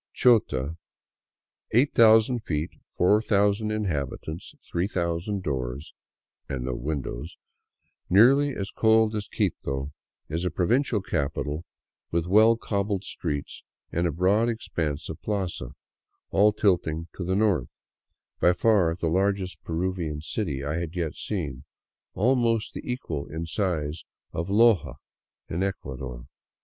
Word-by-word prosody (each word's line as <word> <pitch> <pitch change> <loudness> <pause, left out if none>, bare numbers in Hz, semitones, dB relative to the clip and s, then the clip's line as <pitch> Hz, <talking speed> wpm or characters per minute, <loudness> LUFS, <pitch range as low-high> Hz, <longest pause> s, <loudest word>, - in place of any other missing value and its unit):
Chota, 80 - +3 0.5
" - - -53
8000 115 -1 +5
feet, 80 -6 -2 0.2
4000 105 +2 +2
inhabitants, 80 -6 -3
3000 90 +1 -1
doors 65 -2 -3 0.2
" - - -68
— - - -52
and 65 -3 -3
no 65 - -2
windows, 70 +3 -4 0.7
nearly 135 +8 +5
as 100 -1 -4
cold 110 0 +4
as 105 -2 -3
Quito, 70 +1 -2 0.3
is 80 +3 -2
a 90 - +1
provincial 105 - +1
capital 75 -1 -2 0.4
with 85 -1 0
well 110 +5 +5
cobbled 100 -3 -1
streets 75 -7 -4 0.3
and 85 +1 +1
a - - 0
broad 95 +8 +2
expanse 80 -9 -3
of 80 - -7
plaza, 95 - -3 0.6
all 105 +2 +5
tilting 85 -6 +1
to 95 - -4
the 95 +2 0
north, 100 - +1 0.6
by 90 - +5
far 90 -4 +3
the 85 - -4
largej 95 +2 +1
Peruvian 85 -2 -2
city 75 -3 -3
I 75 +3 -1
had 85 0 -5
yet 85 -4 -1
seen, 75 - -4 0.5
almost 115 0 +2
the - - -5
equal 85 - -4
in 80 +2 -5
size 80 -3 -2 0.3
of 85 +2 -2
Loja 110 0 +4 0.5
in 80 - -3
Ecua^ 95 0 -3
dor. 60 -1 -7
90 Hz, 130 wpm, -26 LUFS, 75-105 Hz, 0.7 s, 8000